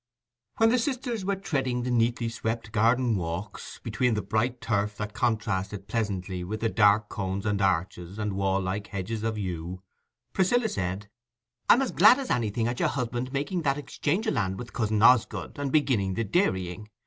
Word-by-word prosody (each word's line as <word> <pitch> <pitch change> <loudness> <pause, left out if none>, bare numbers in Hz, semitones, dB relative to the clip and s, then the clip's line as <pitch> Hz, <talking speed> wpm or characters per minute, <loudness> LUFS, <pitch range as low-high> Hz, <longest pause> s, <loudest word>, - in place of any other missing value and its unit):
When 225 0 +5
the 250 +2 +3
sisters 245 -4 -2
were 200 +1 0
treading 135 -10 -1
the 125 - -2
neatly 120 0 +1
swept 115 -1 -3
garden 115 +1 +2
walks, 90 +4 -5
between 125 -3 +1
the 105 - -2
bright 120 +3 0
turf 105 -2 -1
that 105 0 -4
contrasted 105 -4 -1
pleasantly 95 -5 -2
with 110 +5 -5
the 115 - +1
dark 105 0 +4
cones 95 0 -3
and 105 -2 0
arches 90 0 -1
and 105 -2 -2
wall 95 0 +1
like 95 +2 -3
hedges 105 +2 -4
of 110 0 -2
yew, 90 -1 -5 0.5
Priscilla 220 +5 +2
said— 95 - -3 0.6
"I'm 265 - +7
as 265 - -2
glad 255 - +7
as 275 -2 -4
anything 115 -1 0
at 120 0 -3
your - - +2
husband's 125 -1 -3
making 145 +6 -1
that 140 -3 +1
exchange 145 - -2
o' - - +3
land 95 -1 -1
with 120 -1 -8
cousin 110 -2 0
Osgood, 125 +3 +3
and 140 -2 -2
beginning 120 -11 +2
the 115 - 0
dairying. 100 - -1
110 Hz, 180 wpm, -27 LUFS, 100-125 Hz, 0.6 s, I'm